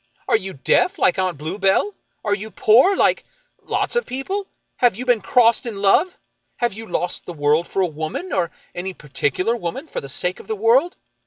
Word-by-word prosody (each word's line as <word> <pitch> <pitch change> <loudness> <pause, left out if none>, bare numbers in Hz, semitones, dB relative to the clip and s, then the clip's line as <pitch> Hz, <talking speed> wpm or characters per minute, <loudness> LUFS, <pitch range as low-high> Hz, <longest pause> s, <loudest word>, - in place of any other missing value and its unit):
Are - - +3
you 195 -3 -2
deaf, 365 - +2
like 180 - +2
Aunt 185 -4 0
Bluebell? 195 - 0 0.3
Are 205 - +2
you 210 +2 -4
poor, 250 - +4
like - - +2 0.2
— - - -47
lots - - -2
of 480 - 0
people? 380 +11 -4 0.3
Have 245 -5 +3
you 250 +4 -6
been 245 -4 +3
crossed 235 +2 +3
in 215 -4 -5
love? 285 - +3 0.4
Have 240 -3 0
you 225 +2 -9
lost 180 - -2
the 175 - -5
world 150 +2 +1
for 195 - 0
a - - +3
woman, 160 - -5
or 175 -3 +1 0.2
any 185 +1 -5
particular 150 - -1
woman 240 - -5
for - - -4
the 140 - -9
sake 180 +6 -1
of - - -13
the 220 - -2
world 240 - +3
205 Hz, 200 wpm, -21 LUFS, 180-250 Hz, 0.4 s, poor